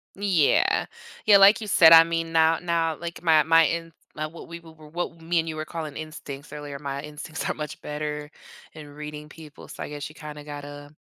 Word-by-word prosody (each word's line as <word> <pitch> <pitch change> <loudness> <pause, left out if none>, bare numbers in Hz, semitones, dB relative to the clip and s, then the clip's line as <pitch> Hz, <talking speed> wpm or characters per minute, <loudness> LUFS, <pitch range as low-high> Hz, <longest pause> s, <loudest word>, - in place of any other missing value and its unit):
Yeah. 190 -7 +2 0.4
Yeah, 205 -2 +8
like 200 +3 +7
you 215 - -6
said, 165 -5 +7
I 165 0 +10
mean, 165 0 -3
now 160 0 +3
now, 165 -2 0
like, 170 0 -7
my 160 -3 +4
my 165 +2 +5
in 165 +1 -3 0.2
now 155 0 -4
what 165 - -12
we 170 0 -8
w 165 -1 -16
were 155 -1 -14
what 170 +1 -5
me 170 +1 0
and 165 0 -2
you 155 - -5
were 155 - -4
calling 155 -3 -6
instincts 150 -3 -9
earlier, 145 -2 -7
my 140 -1 -5
instincts 150 +2 -6
are - - 0
much 150 -1 -7
better 150 0 -5 0.4
in 155 -2 -11
reading 150 +1 -9
people 150 -1 -13
so, - - -8
I - - -7
guess 145 -1 -6
you 150 - -15
kinda 150 -2 -9
gotta 145 0 -9
155 Hz, 215 wpm, -25 LUFS, 150-165 Hz, 0.4 s, I